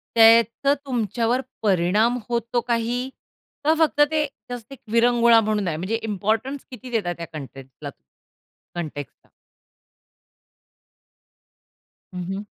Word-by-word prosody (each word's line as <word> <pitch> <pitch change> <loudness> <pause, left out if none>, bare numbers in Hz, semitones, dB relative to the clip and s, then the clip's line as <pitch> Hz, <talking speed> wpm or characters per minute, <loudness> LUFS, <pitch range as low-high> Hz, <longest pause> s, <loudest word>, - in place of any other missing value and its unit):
त्याचं 230 +4 +6
तुमच्यावर 235 0 0 0.2
परिणाम 205 +5 +2
होतो 235 0 0
काही? 240 +2 -1 0.5
का 310 +2 +4
फक्त 310 -2 +3
ते 305 -1 +2 0.2
जस्ट 245 0 -7
एक 270 - -12
विरंगुळा 235 0 +5
म्हणून 210 -2 -1
आहे? 160 -2 -1
म्हणजे 190 +7 -2
इम्पोर्टन्स 220 +6 -2
किती 250 0 -9
देता 205 -7 0
त्या 170 0 -7
कन्टेक्सटला 135 -3 -9 0.9
कन्टेक्सटला? 150 -4 -7 2.8
हं, 180 -1 -4
हं. 200 +1 -4
230 Hz, 105 wpm, -23 LUFS, 195-245 Hz, 2.8 s, त्याचं